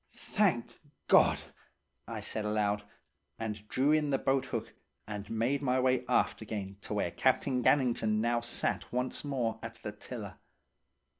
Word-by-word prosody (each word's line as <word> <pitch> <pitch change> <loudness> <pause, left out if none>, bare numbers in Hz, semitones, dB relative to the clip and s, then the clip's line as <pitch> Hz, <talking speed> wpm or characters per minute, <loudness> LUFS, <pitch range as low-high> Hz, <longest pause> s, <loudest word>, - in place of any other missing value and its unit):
"'Thank 190 - +1 0.4
God!' - - +5 0.6
I - - -5
said 110 - -3
aloud, 105 -1 +1 0.6
and 105 -2 -5
drew 135 +6 +2
in 155 -1 +3
the 135 - +3
boathook, 130 -5 -1 0.3
and 105 -1 -6
made 120 +5 +1
my 130 -2 +2
way 130 -1 +2
aft - - +2
again 100 -3 -5
to 105 - -4
where 95 -4 0
Captain 130 +2 +2
Gannington 120 -6 +3
now 120 +2 +2
sat 120 +1 -2
once 125 +1 -2
more 130 -6 -1
at - - -6
the - - -3
tiller. - - -8
120 Hz, 145 wpm, -32 LUFS, 105-130 Hz, 0.6 s, God